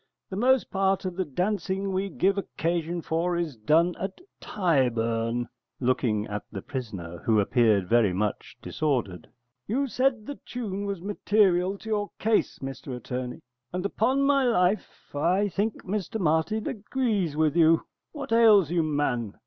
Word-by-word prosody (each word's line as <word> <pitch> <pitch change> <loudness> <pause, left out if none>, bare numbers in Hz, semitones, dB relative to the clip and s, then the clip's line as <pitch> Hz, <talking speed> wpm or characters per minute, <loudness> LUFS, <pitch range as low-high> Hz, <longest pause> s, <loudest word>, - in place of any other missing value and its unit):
The - - -3
most 255 +4 +2
part 195 0 +1
of 185 -1 -3
the 190 - 0
dancing 190 +4 -1
we 195 +1 -1
give 195 +1 +1
occasion 170 -2 -2
for 170 +2 0
is 165 -6 -2
done 160 +11 +3
at 190 0 -4 0.2
Tyburn. 120 - 0 0.3
[Looking 120 -4 +1
at 105 -1 -4
the 100 -3 -6
prisoner, 100 -11 -6
who 110 -2 +2
appeared 105 -2 +3
very 115 -3 +4
much 105 +3 -3
disordered.] 120 - -2 0.4
You 265 +7 0
said 255 -3 0
the 285 - -7
tune 205 -5 -4
was 195 -3 -4
material 195 -2 +2
to 220 - -13
your 205 -1 -1
case, 220 0 +1
Mr 135 -1 -6
Attorney, 125 +1 -5 0.3
and 180 +1 -3
upon 255 +7 +1
my 275 -1 +3
life 205 -4 0
I 180 +8 +2
think 205 +3 -2
Mr 205 +2 -3
Martin 170 +6 +1
agrees 210 - -1
with 155 -1 +2
you. 165 -1 +4 0.3
What 285 -6 -7
ails 215 -8 +6
you, 175 -1 +2
man? 145 -8 -1
175 Hz, 150 wpm, -26 LUFS, 125-205 Hz, 0.4 s, ails